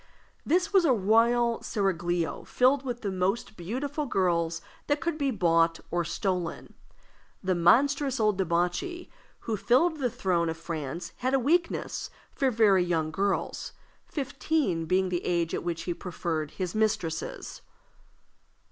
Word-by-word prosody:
This 360 +5 +1
was 385 -2 +6
a 290 -6 +4
royal 230 +3 +3
seraglio 175 -4 -1
filled 260 +2 +2
with 245 -2 -4
the 200 - -2
most 190 +4 -1
beautiful 275 - -3
girls 170 -5 +1 0.3
that 290 0 +1
could 335 0 -1
be 285 -3 0
bought 165 -6 +2
or 175 0 +1
stolen. 175 0 -3 0.7
The 185 0 +1
monstrous 265 - +3
old 215 -2 +3
debauchee 180 - -1 0.3
who 225 - -2
filled 295 - +2
the 255 -3 +1
throne 175 -6 0
of 160 - -4
France 165 -1 -5
had 255 +2 0
a - - +3
weakness 335 +7 0 0.2
for 270 - +1
very 210 -6 +4
young 165 -3 0
girls, 195 +5 -2 0.3
fifteen 275 - -1
being 185 +1 +2
the 175 -1 -2
age 170 -2 0
at - - -2
which 170 -1 -3
he 175 - -2
preferred 165 -4 -3
his 180 +1 -4
mistresses. 200 -7 -2
195 Hz, 140 wpm, -28 LUFS, 170-260 Hz, 0.7 s, was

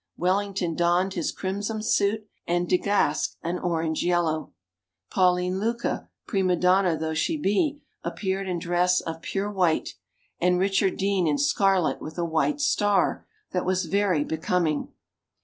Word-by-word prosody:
Wellington 185 -1 0
donned 175 +3 +2
his 170 -4 -1
crimson 205 +3 -3
suit, 215 0 +1 0.2
and 175 +1 0
De 180 - +3
Gasx 200 -7 +1
an 175 +2 -2
orange 165 -2 -1
yellow; 170 -3 0 0.6
Pauline 180 0 +2
Lucca, 235 +3 -2 0.2
prima 190 -4 +1
donna 180 -1 +3
though 160 0 -2
she 310 - 0
be, 290 - 0 0.2
appeared 190 -1 -2
in 180 - -1
dress 180 +1 +2
of 165 0 -6
pure 200 +3 -2
white, 180 -5 +1 0.5
and 180 +1 +3
Richard 195 +1 +1
Dean 195 -3 +1
in 145 -1 +2
scarlet 185 +5 +2
with 155 +2 -8
a 170 - 0
white 165 - 0
star 205 -9 +1 0.2
that 180 - -1
was 185 0 0
very 195 -6 +1
becoming. 160 -1 -1
180 Hz, 145 wpm, -25 LUFS, 170-200 Hz, 0.6 s, De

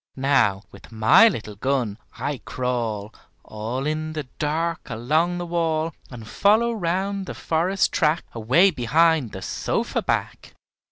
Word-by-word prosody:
Now, 125 -8 +2
with - - -15
my 135 - +6
little 110 - -3
gun, 120 -2 -1 0.2
I 145 -3 -3
crawl 115 -4 -3 0.3
All 115 +5 -5
in 155 +1 -2
the 155 -1 -3 0.2
dark 165 +2 -2
along 155 +10 0
the 175 - -4
wall, 165 -2 -1 0.2
And 115 -4 -10
follow 220 - +3
round 190 0 -2
the - - -6
forest 175 +3 0
track 155 +1 +1
Away 130 - +4
behind 155 - +2
the 95 - -8
sofa - - -2
back. - - -3
150 Hz, 135 wpm, -23 LUFS, 120-170 Hz, 0.3 s, my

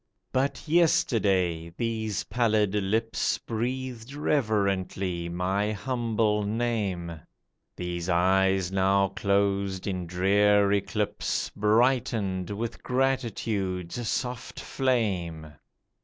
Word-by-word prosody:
But 135 +4 -1
yesterday 100 - +2
these 110 -3 -2
pallid 110 -4 +1
lips 105 +3 0
Breathed 125 +1 -4
reverently 100 - 0
my 95 +4 0
humble 115 -2 0
name; 100 -7 -2 0.5
These 90 0 -4
eyes 95 +1 +3
now 95 0 +3
closed 100 -1 0
in 90 -3 -3
drear 100 +3 +3
eclipse 100 +1 -1
Brightened 110 -4 +1
with 110 +3 -4
gratitude's 115 -6 -1
soft 125 -1 -3
flame 90 - -1
100 Hz, 80 wpm, -27 LUFS, 95-115 Hz, 0.5 s, eyes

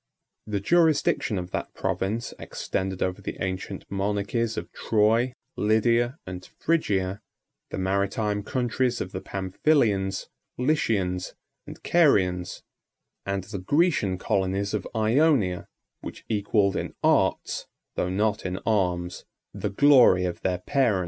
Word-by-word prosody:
The 105 -2 -1
jurisdiction 155 - +2
of 90 0 -5
that - - -4
province 110 +5 -2
extended 95 -1 -3
over 95 0 -2
the - - -5
ancient 95 +1 -4
monarchies 105 +3 -1
of - - -5
Troy, 115 +3 +2 0.2
Lydia, 115 +4 +2
and 90 0 -7
Phrygia, 100 - 0 0.5
the - - -5
maritime 100 +2 0
countries 125 +1 -1
of 90 - -4
the 95 - -5
Pamphylians, 95 -1 0 0.3
Lycians, 110 -10 0 0.3
and - - -10
Carians, 95 - +2 0.6
and 100 -1 -1
the 100 0 -6
Grecian 125 - +2
colonies 95 +2 -1
of 105 -3 -2
Ionia, 110 - +2 0.3
which - - -9
equalled 100 -2 +1
in - - -4
arts, - - +1 0.3
though 90 - 0
not 105 +3 0
in 95 0 -3
arms, 90 -5 0 0.3
the - - -3
glory 120 -6 +6
of 90 -1 -4
their 90 -1 0
parent. 115 +1 +1
100 Hz, 120 wpm, -26 LUFS, 95-120 Hz, 0.6 s, glory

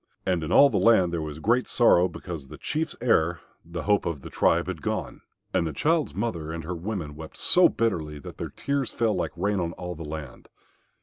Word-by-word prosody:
And 90 -3 0
in 80 - -4
all 140 +6 +7
the 105 - +1
land 95 -7 +4
there 85 - -1
was 75 -1 -5
great 120 +9 +1
sorrow 90 -7 +5
because 85 -7 -7
the - - -10
Chief's 155 +2 -2
heir, 85 -8 +2 0.2
the 85 -1 -6
hope 105 -3 +2
of 80 -5 -3
the - - -9
tribe, - - +2
had - - -5
gone. - - -3 0.3
And 85 - +1
the 80 - -4
child's 160 - +1
mother 90 -7 -3
and 85 0 -5
her 90 +3 -4
women 85 -4 -5
wept 80 0 -10
so 180 0 +6
bitterly 80 -10 -1
that 70 - -10
their - - -4
tears 140 -2 -2
fell 115 -2 +1
like 90 - -1
rain 100 +2 0
on 85 -1 -2
all 90 0 -6
the 80 -1 -8
land. 75 -3 -8
90 Hz, 220 wpm, -26 LUFS, 80-115 Hz, 0.3 s, all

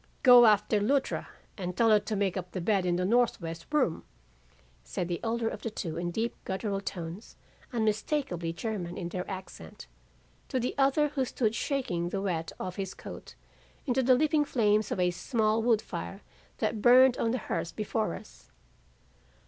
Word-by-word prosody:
"'Go 245 -2 +9
after 210 0 +3
Luttra 265 +7 0 0.3
and 180 -1 -4
tell 230 -1 +4
her 210 - +6
to 210 +1 -4
make 195 -3 0
up 180 -1 -5
the 185 - -2
bed 190 0 +1
in 175 - +2
the 180 +1 0
northwest 185 -7 0
room,' 260 - +1 0.8
said 175 - -3
the 175 -1 -2
elder 230 0 0
of - - -4
the 230 - -3
two 175 -6 -5
in 175 +1 -2
deep 225 +6 -2
gutteral 195 +1 -2
tones 175 +3 -6 0.4
unmistakably 215 - -1
German 175 -1 -4
in 170 -2 -4
their 180 +1 -5
accent, 185 - -8 0.6
to 260 - 0
the 245 - -1
other 280 +2 +3
who 280 -2 -1
stood 230 -3 0
shaking 230 - -1
the 195 - -2
wet 170 -4 -2
off 185 -1 -5
his 190 -2 -4
coat - - -10 0.5
into 260 -1 +1
the 255 0 +5
leaping 305 +2 +3
flames 215 -6 +1
of - - -1
a 180 0 +3
small 215 +4 0
wood 225 -2 +2
fire 85 +1 -6 0.4
that 215 - -1
burned 250 +2 +7
on 230 - +1
the 250 - 0
hearth 170 - -4
before 215 -3 -1
us. - - -14
210 Hz, 175 wpm, -29 LUFS, 180-240 Hz, 0.8 s, Go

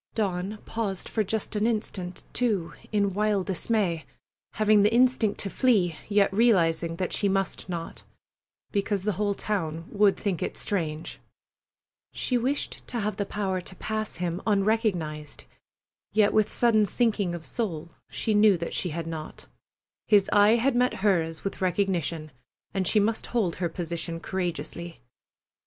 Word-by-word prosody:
Dawn 195 -1 -1
paused 210 -5 -3
for 220 - 0
just 215 +2 -2
an 210 +2 +2
instant, 190 -5 -3
too, 210 -9 0 0.2
in 200 -2 +1
wild 205 -1 +1
dismay, 190 -4 0 0.5
having 215 -1 +4
the 210 +2 +4
instinct 240 -3 +3
to 200 - -3
flee, 200 -10 +2
yet 200 -2 +3
realizing 170 -7 +3
that 185 +1 -2
she 205 - +2
must 195 0 -1
not, 170 -2 -5 0.7
because 200 -1 0
the 210 - +1
whole 205 +1 -1
town 165 -7 -2
would 205 -1 +3
think 195 -6 -2
it - - -3
strange. 160 -5 -3 0.9
She 250 - -1
wished 260 +4 -1
to 240 - -3
have 210 +1 -2
the 200 - -2
power 190 -3 -2
to 185 - -9
pass 215 +2 -3
him 175 +1 -3
unrecognized, 195 - 0 0.7
yet 210 -1 +4
with 215 -1 +3
sudden 215 -3 +3
sinking 205 -5 +1
of 165 -2 -8
soul 170 -9 -3 0.2
she 220 - -1
knew 210 -2 +5
that 170 0 -4
she 180 - -1
had 165 +1 -4
not. 160 -2 -7 0.6
His 205 -2 +4
eye 210 +2 +6
had 245 +2 +2
met 250 +1 +2
hers 165 -5 +1
with 195 - -4
recognition, 175 -4 0 0.4
and 190 -2 0
she 215 - +4
must 220 +2 0
hold 205 -9 0
her 175 -1 -1
position 170 0 -4
courageously. 170 -3 -4
200 Hz, 150 wpm, -27 LUFS, 170-215 Hz, 0.9 s, eye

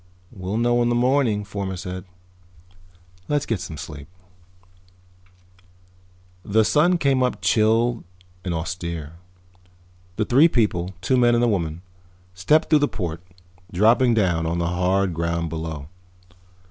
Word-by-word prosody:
"We'll 95 +3 -4
know 120 +1 +2
in 120 - +2
the 120 - +1
morning," 125 -4 +2
Fomar 100 -1 -4
said. 90 +1 -6 1.2
"Let's 145 -1 0
get 115 -4 -2
some 80 -2 -7
sleep." 75 -1 -9 2.4
The 110 +2 +2
sun 175 +8 +3
came 140 -5 +1
up 125 -1 0
chill 115 +2 +2 0.4
and 90 - -3
austere. 85 -1 -5 1.0
The 110 - -1
three 135 +9 +5
people, 95 - 0
two 130 +8 +1
men 120 -1 +4
and 120 - +2
a - - +3
woman, 85 -5 -2 0.5
stepped 150 - +2
through 155 - +6
the 145 - +2
port, 85 - -5 0.5
dropping 115 +6 +4
down 85 -6 +1
on 85 +1 -1
the 85 0 -1
hard 90 +1 +1
ground 85 0 -2
below. 80 -3 -5
100 Hz, 135 wpm, -22 LUFS, 85-120 Hz, 2.4 s, through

